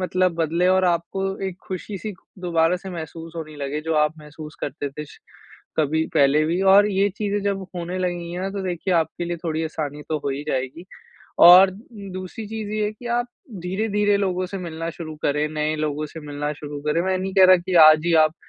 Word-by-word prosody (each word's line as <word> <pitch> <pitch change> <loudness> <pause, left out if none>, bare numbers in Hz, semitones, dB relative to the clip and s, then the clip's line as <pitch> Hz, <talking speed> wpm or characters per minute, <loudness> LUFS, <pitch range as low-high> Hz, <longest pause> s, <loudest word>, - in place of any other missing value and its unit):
मतलब 185 -1 +1
बदले 165 +2 +1
और 185 0 +3
आपको 175 +2 0 0.3
एक 180 - -9
खुशी-सी 200 +3 -5 0.3
दोबारा 170 0 +2
से 190 +1 -9
महसूस 165 -1 -7
होने 155 -2 -7
लगे 145 +1 -3
जो 160 0 -1
आप 150 +1 +2
महसूस 150 0 -11
करते 145 0 -4
थे 150 +2 -7 0.7
कभी, 160 +1 +1
पहले 145 +1 +4
भी 175 +3 0
और 205 +1 +7
ये 195 +1 +2
चीज़ें 205 -1 -1
जब 195 -2 -1
होने 175 +2 -4
लगेंगी 175 -1 -3
ना 190 +1 -2
तो 195 0 -4
देखिये 180 +1 -1
आपके 165 +1 -1
लिए 175 0 -3
थोड़ी 160 0 -1
आसानी 150 -2 -4
तो 155 - 0
हो - - 0
ही 140 +2 -4
जाएगी। 130 +6 -3 0.6
और 185 +2 +9 0.4
दूसरी 185 +4 -7
चीज़ 220 -2 -5
ये 215 -1 0
है 210 - -2
की 240 +3 -12
आप 240 - -1 0.4
धीरे-धीरे 205 +2 +1
लोगों 185 -2 -1
से 195 +1 -6
मिलना 165 -2 -5
शुरू 160 -2 -8
करें, 150 +1 +1
नए 155 0 -1
लोगों 150 0 -2
से 160 +2 -10
मिलना 145 0 -4
शुरू 145 -1 -7
करें, 150 +3 +2
मैं 190 0 0
ये 185 - 0
नहीं 190 +1 -3
कह 190 -1 +7
रहा 185 0 +8
की 180 +1 -4
आज 155 +1 +5
ही 170 - +3
आप 155 +1 -1
170 Hz, 210 wpm, -23 LUFS, 155-190 Hz, 0.7 s, और